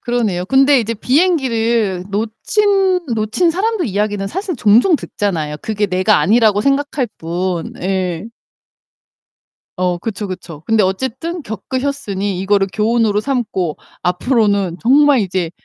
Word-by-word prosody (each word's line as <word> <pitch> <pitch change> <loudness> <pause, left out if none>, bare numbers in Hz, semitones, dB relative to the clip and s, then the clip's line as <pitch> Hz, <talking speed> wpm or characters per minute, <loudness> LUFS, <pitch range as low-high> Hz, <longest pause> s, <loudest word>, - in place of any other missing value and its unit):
그러네요. 215 -7 -1
근데 270 +2 +4
이제 230 0 -3
비행기를 235 - +1
놓친 370 - +1
놓친 220 +11 +1
사람들 390 +1 -1
이야기는 205 -1 -1
사실 365 - -4
종종 235 - +4
듣잖아요. 160 - -3
그게 215 -1 -2
내가 185 +3 +2
아니라고 215 -1 +3
생각할 275 -1 0
뿐. 175 +1 -3
예. 185 -1 -2 1.5
어 180 -1 0
그쵸, 205 +1 -5
그쵸. 170 -5 -8
근데 225 -1 +3
어쨌든 260 - -3
겪으셨으니 215 -4 -3
이거를 195 0 +2
교훈으로 215 -1 +1
삼고 210 - -2 0.3
앞으로는 200 -1 +1
정말 280 +1 +4
이제 185 -3 -2
215 Hz, 290 characters per minute, -17 LUFS, 190-270 Hz, 1.5 s, 근데